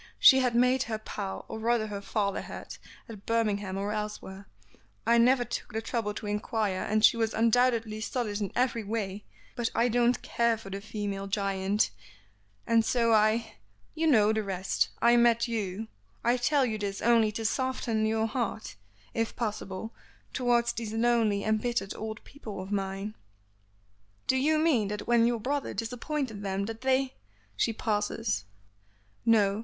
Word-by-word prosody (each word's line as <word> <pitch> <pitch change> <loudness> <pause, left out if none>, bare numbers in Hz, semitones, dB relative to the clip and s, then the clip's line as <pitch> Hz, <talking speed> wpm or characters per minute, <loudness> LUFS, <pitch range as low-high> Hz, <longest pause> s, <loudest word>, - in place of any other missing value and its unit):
She 265 - +8
had 250 -2 +1
made 250 +2 +4
her 220 - -1
pile, 205 -2 -6
or 220 - -6
rather 230 0 +1
her 205 -2 -5
father 200 -1 -1
had, - - -8 0.3
at 210 -3 -11
Birmingham 210 -4 0
or 200 +1 -2
elsewhere, 210 -2 -5 0.6
I 235 +1 +5
never 245 +1 +4
took - - -5
the 220 - 0
trouble 225 -2 -2
to 215 - -6
inquire, 210 -1 -1
and 215 +1 +3
she - - +5
was 225 -1 0
undoubtedly 230 -1 +2
solid 220 -3 -2
in 200 - -2
every 245 -2 +1
way, 205 -1 -3 0.3
but 240 -2 -1
I 240 +1 +3
don't 240 +1 +3
care 235 -1 +1
for 195 -3 -10
the 195 +1 -4
female 205 -2 -4
giant, 195 - 0 0.7
and 230 -1 +4
so 230 0 +2
I 220 - +2 0.4
you 325 +1 0
know 220 -7 +5
the 220 - 0
rest, 190 -2 -1
I 235 +1 +6
met 235 0 +4
you; 220 -2 -3 0.4
I 240 +1 +3
tell 260 +3 +2
you 220 -3 -2
this 200 -1 -3
only 230 -2 +4
to 225 +1 -4
soften 240 -2 0
your 220 0 +1
heart, 220 - -3 0.4
if 225 0 -1
possible, 210 -1 -4 0.4
towards 240 -2 +2
these 225 -2 -5
lonely, 225 -3 +2
embittered 220 -1 0
old 220 0 -6
people 225 -8 -9
of 190 +2 -7
mine." 195 +1 -2 1.1
"Do - - +2
you 300 +4 +3
mean 300 -10 +3
that 210 +1 -4
when 235 -1 +4
your 240 -1 0
brother 280 +5 -2
disappointed 245 0 -3
them 195 0 -2
that 225 +2 -6
they 265 0 +1 0.2
" 100 0 -35
she - - +1
pauses. 205 - -1 0.8
"No. 205 -3 +4
220 Hz, 165 wpm, -29 LUFS, 205-235 Hz, 1.1 s, She